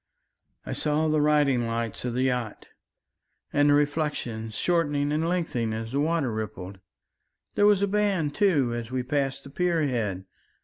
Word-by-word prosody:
"I - - -4
saw 155 +1 0
the 155 -1 +2
riding 145 -5 +3
lights 115 0 -3
of 120 -1 -2
the 130 - +1
yachts 125 -4 -2 0.9
and 145 0 +4
the 145 - +6
reflections 145 -7 -1
shortening 145 -5 +1
and 160 +2 0
lengthening 125 -11 -1
as 110 +1 -5
the 140 - 0
water 155 -4 +1
rippled 100 -3 -6 0.7
there 205 - +4
was 200 -1 +4
a - - +3
band, 195 -7 +1
too, 155 - +2
as 120 -1 -4
we 130 -1 -2
passed 135 0 -1
the 140 - -12
pier 170 +1 +1
head. 105 -8 -2
145 Hz, 165 wpm, -26 LUFS, 115-155 Hz, 0.9 s, the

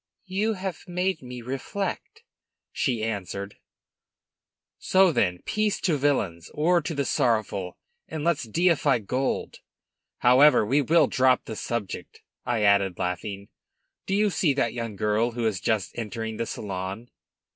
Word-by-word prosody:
"You 205 +4 0
have 190 -2 -6
made 180 -1 -1
me 125 -1 -8
reflect," 195 - -4 0.5
she 120 -5 -1
answered. 100 -2 -4 1.2
"So, 190 -1 +4
then, 90 - 0
peace 215 -1 0
to 170 - +2
villains, 105 - 0
war 170 +3 +3
to 160 +2 -4
the 140 -1 0
sorrowful, 110 -7 0 0.3
and 155 -2 -5
let's 165 -6 +1
deify 160 0 +3
gold! 125 +5 -2 0.6
However, 130 0 +6
we 135 +7 +3
will 160 +3 +4
drop 130 -1 +2
the 110 - -6
subject," 110 -3 -5 0.2
I 115 -3 +1
added, 100 -3 +3
laughing. 100 +3 -4 0.6
"Do 195 - +1
you 210 0 +2
see 160 -4 +1
that 120 -4 0
young 115 -3 -4
girl 105 +4 +1
who 120 -1 -2
is 105 -5 0
just 110 -5 0
entering 110 -1 -4
the 115 - -2
salon?" 100 +3 -5
120 Hz, 140 wpm, -26 LUFS, 105-165 Hz, 1.2 s, However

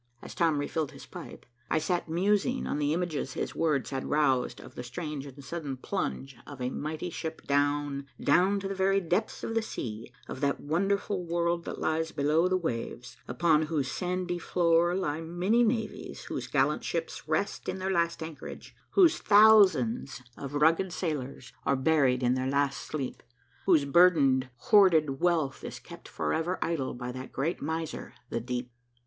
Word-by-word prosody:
As - - -8
Tom 165 -3 +2
refilled 145 +1 -2
his - - -11
pipe, - - -10 0.2
I - - +2
sat 170 +2 -1
musing 205 +9 +1
on 145 - -2
the 145 0 +1
images 160 -5 -2
his - - -3
words 150 -5 0
had 135 -1 -3
roused 135 -4 +1
of - - -12
the - - -6
strange 145 +2 -5
and 140 +1 -11
sudden 145 -4 -5
plunge 130 - -3
of 140 -2 -9
a 125 0 -2
mighty 155 +5 -4
ship 160 0 -5
down, 145 0 0
down 185 +7 +3
to 195 - -3
the 195 - -3
very 195 +1 +2
depths 180 +4 -1
of - - -3
the 225 - +2
sea, 115 - -6 0.2
of 130 - -7
that 140 -1 +1
wonderful 195 +4 0
world 170 0 -1
that - - -5
lies 160 +1 -1
below 155 +4 +2
the 185 0 +2
waves, 120 -6 -4
upon 155 +3 +2
whose 145 -4 -1
sandy 180 -1 -2
floor 170 0 +2
lie 160 -5 -1
many 175 +8 +1
navies 225 -2 -2
whose - - -5
gallant - - +1
ships - - -4
rest - - -1
in - - -3
their 190 +1 -2
last 170 -2 0
anchorage, 160 -3 -9 0.2
whose 350 -4 +5
thousands 185 - +5
of 140 +1 -7
rugged 165 +5 +3
sailors 140 -7 -4
are 140 - +2
buried 130 -2 +2
in 125 0 +3
their 130 0 -1
last 140 0 +1
sleep, 140 -4 -5 0.5
whose 160 -7 +5
burdened, 140 -5 +4
hoarded 160 - +4
wealth 165 -7 +1
is - - -6
kept - - -12
forever 160 - -1
idle 150 -7 -2
by 125 0 -5
that 130 +1 -8
great 155 +7 -2
miser, 160 +1 -4 0.2
the - - -1
deep. 125 +1 -4
160 Hz, 170 wpm, -29 LUFS, 135-180 Hz, 0.5 s, whose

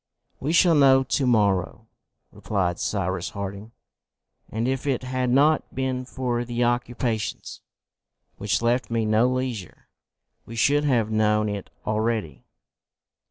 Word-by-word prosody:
"We 145 - -2
shall 175 0 +5
know 135 -3 +5
to 130 +1 0
morrow," 100 -6 +1 0.5
replied 90 -4 -2
Cyrus 95 -3 -2
Harding, 100 +2 -7 0.8
"and 115 +2 -2
if 130 +2 -2
it 130 -2 0
had 130 0 -1
not 145 +5 +2
been 130 -1 -2
for 125 -2 -2
the 120 0 -2
occupations 120 -2 -2 0.8
which 105 +3 -1
left 120 +2 +1
me 115 -1 0
no 110 +3 +3
leisure, 125 -6 -4 0.5
we 115 - -10
should 145 +6 +2
have 115 -6 +1
known 105 0 +2
it 100 -2 -5 0.2
already." 110 - -2
120 Hz, 125 wpm, -24 LUFS, 105-130 Hz, 0.8 s, shall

